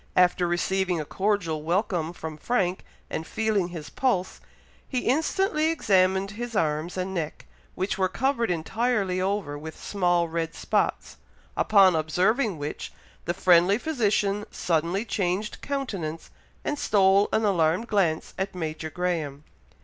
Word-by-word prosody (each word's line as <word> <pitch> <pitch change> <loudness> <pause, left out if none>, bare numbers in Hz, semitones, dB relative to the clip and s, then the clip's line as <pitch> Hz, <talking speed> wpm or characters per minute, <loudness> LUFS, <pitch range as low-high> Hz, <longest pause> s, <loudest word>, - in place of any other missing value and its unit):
After 180 -1 +4
receiving 180 0 0
a 155 - -3
cordial 190 -4 -1
welcome 170 0 0
from 160 -2 -7
Frank, 185 +1 -1 0.2
and 160 - -4
feeling 215 -5 0
his 165 -4 -8
pulse, 195 -9 -1 0.5
he 255 -2 -1
instantly 310 +4 +1
examined 190 - +2
his 235 +2 -6
arms 155 +1 0
and 185 +1 -2
neck, 160 -4 -4 0.3
which 190 +1 -2
were 185 -1 +2
covered 260 -2 0
entirely 190 +2 0
over 190 -7 -2
with 160 +1 -9
small 175 -3 +1
red 165 0 -3
spots, - - -1 0.4
upon 195 -4 +5
observing 185 - +1
which, 145 0 -5 0.3
the 175 - -1
friendly 180 +3 +5
physician 210 -8 0
suddenly 170 +5 0
changed 195 0 -2
countenance, 195 - -4 0.3
and 295 - -1
stole 195 0 +4
an 220 - +2
alarmed 180 +2 +2
glance 185 -7 0
at 190 0 -2
Major 160 -2 -4
Graham. 155 -4 -2
185 Hz, 135 wpm, -26 LUFS, 165-210 Hz, 0.5 s, upon